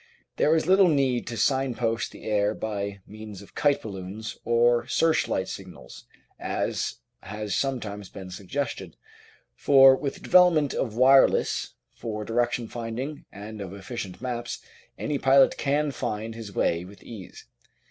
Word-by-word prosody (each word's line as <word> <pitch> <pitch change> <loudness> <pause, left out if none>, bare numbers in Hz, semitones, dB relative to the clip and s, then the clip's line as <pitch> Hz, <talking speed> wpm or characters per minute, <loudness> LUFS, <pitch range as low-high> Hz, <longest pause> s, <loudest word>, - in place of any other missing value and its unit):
There 155 - +4
is 160 - +1
little 190 +2 +6
need 135 -6 +1
to 115 0 -5
signpost 120 -2 0
the - - -13
air 105 0 +1
by 100 -2 -4
means 105 -2 -10
of - - -18
kite 145 -1 +1
balloons 100 +1 -6
or 120 +1 +3
searchlight 160 -12 +1
signals, 95 -1 -10 0.3
as - - -2 0.3
has 105 +1 -5
sometimes 105 -6 -2
been 95 -2 -9
suggested, 100 - -5 0.6
for 135 -1 +7
with 140 +1 -3
the - - -13
development 175 -5 +5
of 115 -5 -2
wireless 135 +2 +4 0.2
for 105 -2 -5
direction 120 +1 0
finding 120 +6 -5
and 105 +2 -8
of 95 0 -7
efficient 100 -1 -7
maps, 120 -2 -4 0.4
any 145 -2 -2
pilot 135 0 +5
can 145 +1 +1
find 110 -4 -4
his 110 -3 -8
way 85 +1 +1
with 95 +2 -13
ease. 105 -6 -10
115 Hz, 140 wpm, -26 LUFS, 100-135 Hz, 0.6 s, for